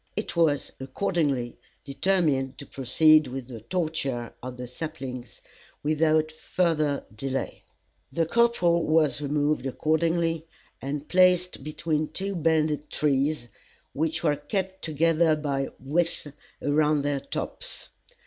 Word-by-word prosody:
It 210 - -3
was, 160 -4 +2
accordingly, 135 -3 -1 0.3
determined 140 -4 +1
to 140 - -8
proceed 155 +4 +4
with 130 -1 -6
the 115 -3 -8
torture 140 - -2
of 125 0 -7
the 125 0 -6
saplings 130 -3 -7 0.4
without 155 +1 +2
further 155 -3 0
delay. 135 +3 -3 0.5
The 165 +4 +1
corporal 175 -5 +3
was 155 -2 +2
removed 145 -1 0
accordingly, 165 +3 0 0.3
and 140 +2 -4
placed 180 -3 +3
between 155 +1 -1
the - - -22
two 195 +1 -3
bended 155 -2 +1
trees, 145 -2 +1 0.5
which 160 +2 -1
were 150 -3 +2
kept 190 +5 -3
together 160 +1 +3
by 140 -3 -2
withes 150 +1 0 0.3
around 150 0 +2
their 145 -1 0
tops. - - -5
155 Hz, 120 wpm, -26 LUFS, 140-165 Hz, 0.5 s, proceed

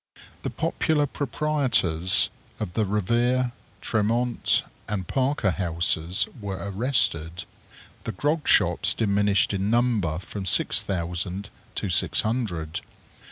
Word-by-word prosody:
The - - -3
popular 150 -2 0
proprietors 130 - +1 0.3
of 100 -5 -4
the 110 +3 +1
Revere, 120 +5 +1 0.3
Tremont, 115 +3 +1 0.2
and 100 -3 -3
Parker 130 - +1
Houses 85 -1 0
were 100 -2 -4
arrested. 95 - +1 0.6
The - - -2
grog 150 - -1
shops - - +3
diminished 100 -4 +2
in 100 +1 -1
number 115 -9 +1
from 95 +1 -6
six - - +3
thousand 90 +2 -3 0.2
to - - -2
six - - +3
hundred. 90 -9 -2
100 Hz, 110 wpm, -25 LUFS, 90-120 Hz, 0.6 s, shops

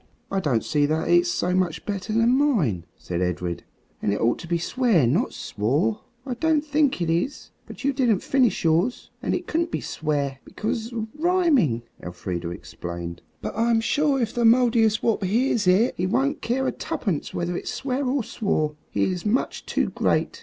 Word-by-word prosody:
"I 195 - +1
don't 135 -11 +1
see 145 -1 +1
that 160 +2 -1
it's 175 0 +4
so 180 +1 0
much 175 -3 0
better 205 +1 -3
than 230 +3 +3
mine," 185 - +1
said 90 0 -4
Edred, 90 -1 -2 0.4
"and 100 - +1
it 100 - -1
ought 115 +1 +1
to 170 - -8
be 170 0 +1
swear, 210 - +2
not 165 - +1
swore." 150 - -1 0.2
"I 260 - -2
don't 310 +3 +1
think 290 - +1
it 165 - -2
is. 175 - -2 0.2
But - - -10
you 280 +1 +2
didn't 245 -7 +2
finish 255 -7 +2
yours. 170 +9 +1
And - - 0
it - - -4
couldn't 335 +1 0
be - - -2
'swear,' 145 -3 -2
because 225 +2 -3
of 225 -2 -3
rhyming," 300 - +2 0.2
Elfrida 90 -1 -5
explained. 85 +1 -7 0.2
"But - - -4
I'm 230 +1 +3
sure 285 +4 +1
if 230 -3 -1
the 240 - 0
Mouldiestwarp 225 -2 +3
hears 220 +1 +1
it 200 +7 +4
he 180 - 0
won't 270 +8 0
care 255 +3 0
tuppence 210 - -3
whether 175 0 -2
it's - - -4
swear 265 +1 -2
or 265 -1 0
swore. 200 -9 -1 0.2
He - - 0
is 180 -2 -1
much 220 +5 -1
too - - 0
great. - - 0
210 Hz, 180 wpm, -24 LUFS, 155-255 Hz, 0.4 s, it's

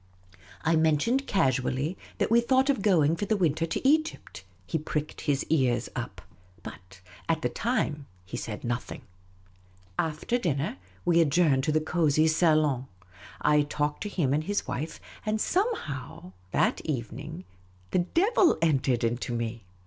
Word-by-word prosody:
I 165 +1 +3
mentioned 160 - +2
casually 135 -1 +1 0.2
that - - 0
we 235 +1 +6
thought 260 +3 +3
of 265 - -2
going 165 -6 +3
for 205 - -3
the 215 +1 +1
winter 165 -2 +1
to 215 - -1
Egypt. 310 - 0 0.2
He 160 - -1
pricked 150 0 -4
his 145 -3 0
ears 130 -6 +1
up. - - -5 0.4
But 90 +1 -11 0.3
at 160 -1 +1
the - - +1
time 150 - -1 0.2
he 95 - -7
said 105 -2 -5
nothing. 120 +1 -4 1.0
After 165 +10 0
dinner, 150 - -1 0.3
we 170 -1 +4
adjourned 150 -3 +3
to - - +1
the 155 - +3
cosy 155 -1 +2
salon. 155 -5 +2 0.5
I 150 0 +4
talked 145 0 -2
to 210 - -3
him 150 -9 0
and 155 +2 0
his 205 +1 -1
wife; 155 +6 -4 0.2
and 215 0 -1
somehow, 215 - -2 0.2
that - - +1
evening, 150 +5 -5 0.5
the - - +2
devil 360 - +3
entered 135 -6 +2
into 120 +1 -1
me. 115 -2 -4
155 Hz, 150 wpm, -28 LUFS, 135-185 Hz, 1.0 s, we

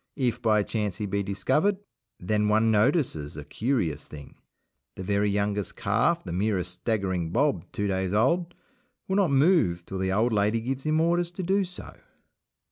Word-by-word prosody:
If 125 -3 0
by 110 -3 +3
chance 105 -3 -2
he 105 - -3
be 100 0 -1
discovered, 130 - +1 0.4
then 105 +3 0
one 110 +1 +3
notices 105 - +1
a 75 - -7
curious 85 - -1
thing. 75 -2 -11 0.6
The 95 - -6
very 100 +2 +1
youngest 100 0 -1
calf, 115 +12 +1
the 85 - -6
merest 95 -1 0
staggering 95 -3 -2
Bob - - 0
two 105 - -2
days 95 -2 -1
old, 165 - +1 0.5
will 190 - 0
not 195 -5 +3
move 135 - +3
till 95 - -5
the 95 0 0
old 110 +4 +2
lady 105 +2 +2
gives 130 +4 -4
him 155 +1 +2
orders 170 +1 +2
to 185 - -5
do 195 +3 +2
so. 180 -1 -9
105 Hz, 170 wpm, -26 LUFS, 95-135 Hz, 0.6 s, by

